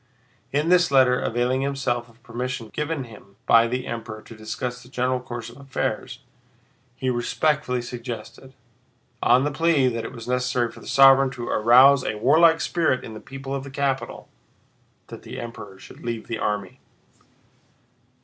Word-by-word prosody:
In 150 +4 0
this 180 -1 +4
letter, 130 -2 +4
availing 125 +2 0
himself 130 -4 -2
of 115 +1 -24
permission 120 -1 -5
given 150 -1 -2
him 105 -4 -15
by 115 0 +5
the 125 +2 -3
Emperor 110 -2 -6
to 115 - -12
discuss 120 +3 -5
the 125 - -16
general 125 0 0
course 120 -2 -7
of 120 - -12
affairs, 135 -3 -4 0.7
he 130 0 -1
respectfully 125 +1 0
suggested—on 120 +1 -4
the 145 - 0
plea 145 -3 +2
that 115 -2 -4
it - - -6
was 115 -2 -10
necessary 125 -1 0
for - - -14
the - - -13
sovereign 135 0 +6
to 120 -2 -7
arouse 130 +5 +6
a - - -2
warlike 160 +8 +5
spirit 160 -7 0
in 110 - -8
the 110 - -8
people 135 +2 -8
of 135 -1 -3
the 140 - -9
capital—that 135 -2 -7
the - - -8
Emperor 105 -5 -8
should - - -14
leave 115 -1 -4
the 115 - -4
army. 105 -3 -3
125 Hz, 160 wpm, -24 LUFS, 115-135 Hz, 0.7 s, sovereign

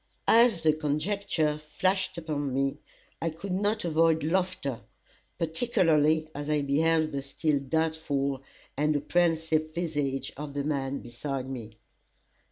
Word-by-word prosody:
As 230 -7 +5
the 155 -1 +5
conjecture 155 0 0
flashed 185 +5 0
upon 150 -4 -2
me, 135 +2 0 0.4
I 165 - 0
could 170 +5 -7
not 205 +2 0
avoid 160 -1 +3
laughter, 175 -6 -1 0.6
particularly 160 -4 +2
as 145 +1 -5
I 150 -1 +1
beheld 155 +3 +2
the 140 -1 -2
still 145 +2 0
doubtful 140 -2 -1 0.3
and 150 +2 +1
apprehensive 160 0 +1
visage 145 -6 -2
of 145 0 -7
the 140 - -1
man 140 -2 -2
beside 130 +2 -5
me. 115 -5 -7
155 Hz, 125 wpm, -28 LUFS, 140-165 Hz, 0.6 s, As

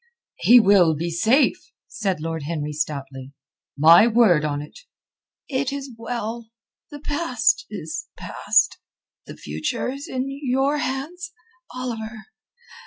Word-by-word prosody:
"He 245 +1 +7
will 190 -7 +5
be 170 +3 -3
safe," 245 - +2 0.3
said 190 -6 -2
Lord 165 0 -4
Henry 150 0 -4
stoutly. 140 -3 -5 0.4
"My 165 +8 +7
word 220 -9 +4
on't." 145 0 -4 0.7
"It 270 -1 -1
is 280 -1 -6
well. 230 0 -5 0.4
The 290 - -9
past 285 -7 0
is 160 -7 -6
past. - - +1 0.5
The - - -10
future 75 - -3
is 280 +4 -8
in 260 -3 -3
your 275 +1 0
hands, 335 +8 -4 0.4
Oliver. 225 -3 -6
225 Hz, 115 wpm, -22 LUFS, 160-265 Hz, 0.7 s, He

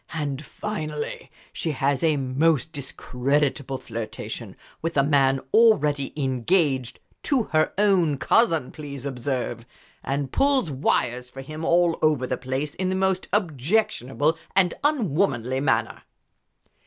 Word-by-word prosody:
And 145 -3 -3
finally 155 -7 -5 0.2
she 160 - -2
has 135 0 0
a 160 -3 +2
most 140 +4 +1
discreditable 135 0 -1
flirtation 115 -3 -6 0.3
with 165 -1 -2
a 140 - +5
man 135 -2 +3
already 150 -12 +4
engaged 135 -1 0 0.2
to 270 -5 +1
her 155 0 +3
own 185 -8 +3
cousin, 165 - +2
please 140 -3 -8
observe! 125 -3 -3 0.4
and 135 -1 -2
pulls 275 - +2
wires 125 -2 0
for 135 - -9
him 155 +4 -7
all 170 0 +3
over 150 -5 +2
the 125 - -1
place 130 +3 -3
in 185 0 -2
the 185 - 0
most 190 -1 0
objectionable 160 - 0 0.2
and 185 -3 +4
unwomanly 150 - +1
manner." 115 -5 0
145 Hz, 125 wpm, -24 LUFS, 130-170 Hz, 0.4 s, a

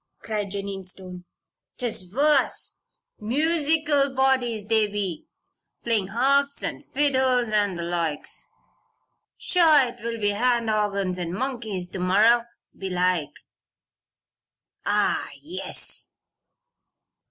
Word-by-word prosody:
cried 210 -2 -3
Jennie 195 0 -5
Stone. 180 -1 -10 0.5
"'Tis 220 -7 -3
worse. 285 +4 +1 0.4
Musickle 295 +2 +2
bodies, 250 -5 +1
they 220 -1 +3
be. 200 -5 -3 0.6
Playin' 220 -5 +2
harps 275 +6 +1
an' - - -4
fiddles, 260 -4 +1
an' 205 -3 +1
the 170 - -4
loikes. 170 -3 -3 0.9
Sure, 310 -8 +4
'twill 230 0 -5
be 205 -1 +2
hand 235 +1 +1
organs 200 -3 0
an' 175 -1 -3
moonkeys 225 -6 -3
to 190 - -5
morrer, 220 +6 +4 0.3
belike. 180 -5 -1 1.5
Ah, - - +1
yes!" 345 +5 -3
220 Hz, 95 wpm, -24 LUFS, 190-265 Hz, 1.5 s, Sure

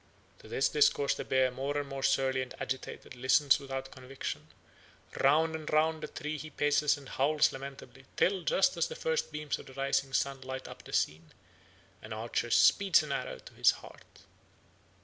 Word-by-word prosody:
To - - -14
this 135 - +1
discourse 145 -1 +3
the - - -5
bear, 130 -1 +2
more 135 +3 -3
and 145 -1 -2
more 135 0 -6
surly 130 -1 +2
and 130 - -6
agitated, 130 -1 -5
listens 130 +4 +4
without 135 -1 -6
conviction; 130 +1 -6 0.7
round 160 +4 +3
and 155 -1 -6
round 155 +1 +2
the - - -4
tree 155 -1 -5
he 155 +3 -7
paces 145 0 +2
and 140 -1 -13
howls 145 +3 +2
lamentably, 135 -1 -10
till, 190 0 +2
just 195 +9 +2
as - - +1
the 480 - -7
first 485 - -1
beams 150 -1 -3
of - - -12
the 135 - -12
rising 135 0 0
sun 135 0 -1
light 130 0 -6
up - - -11
the - - -12
scene, 80 +1 -1 0.7
an 110 - -7
archer 115 +2 -2
speeds 190 - +5
an 150 - -6
arrow 125 - -3
to - - -15
his - - +4 0.2
heart. - - -17
140 Hz, 185 wpm, -31 LUFS, 130-150 Hz, 0.7 s, speeds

